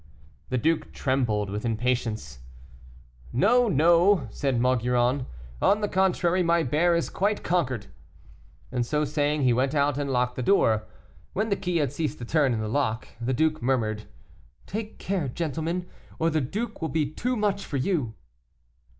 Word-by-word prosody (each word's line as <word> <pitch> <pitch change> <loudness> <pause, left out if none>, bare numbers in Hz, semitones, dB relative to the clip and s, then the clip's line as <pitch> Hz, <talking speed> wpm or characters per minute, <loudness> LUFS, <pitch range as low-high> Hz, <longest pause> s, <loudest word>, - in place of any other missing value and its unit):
The 130 - 0
duke 160 +6 0
trembled 115 -7 0
with 105 +1 -4
impatience. 115 - -1 0.9
"No, 240 - +4
no," 170 - +4
said 135 -1 -1
Maugiron, 125 +1 +1 0.3
"on 210 +1 +3
the 210 - +1
contrary, 185 -2 +2
my 170 -1 +3
bear 165 +6 +2
is 170 - 0
quite 205 +2 -1
conquered." 130 - 0 0.9
And 125 -1 0
so 150 +5 0
saying 145 0 0
he 125 -2 +4
went 130 +4 +1
out 145 -1 +2
and 140 -1 -2
locked 125 -1 0
the - - -1
door. 115 - +3 0.5
When 215 +3 -1
the 200 - +2
key 180 -3 -1
had 145 -6 0
ceased 155 -2 -2
to 120 - -7
turn 145 0 +2
in 110 -2 -1
the 110 - -2
lock 115 -2 -1
the 120 +2 -1
duke 155 +4 +1
murmured, 110 -4 0 0.6
"Take 215 +2 -5
care, 185 -7 -2
gentlemen, 165 +5 -2 0.3
or 165 +1 +1
the 155 -1 +1
duke 210 - -4
will 160 - -1
be 160 -2 +1
too 245 - -2
much 205 -3 0
for 145 - -3
you." 130 - -1
145 Hz, 165 wpm, -26 LUFS, 125-175 Hz, 0.9 s, No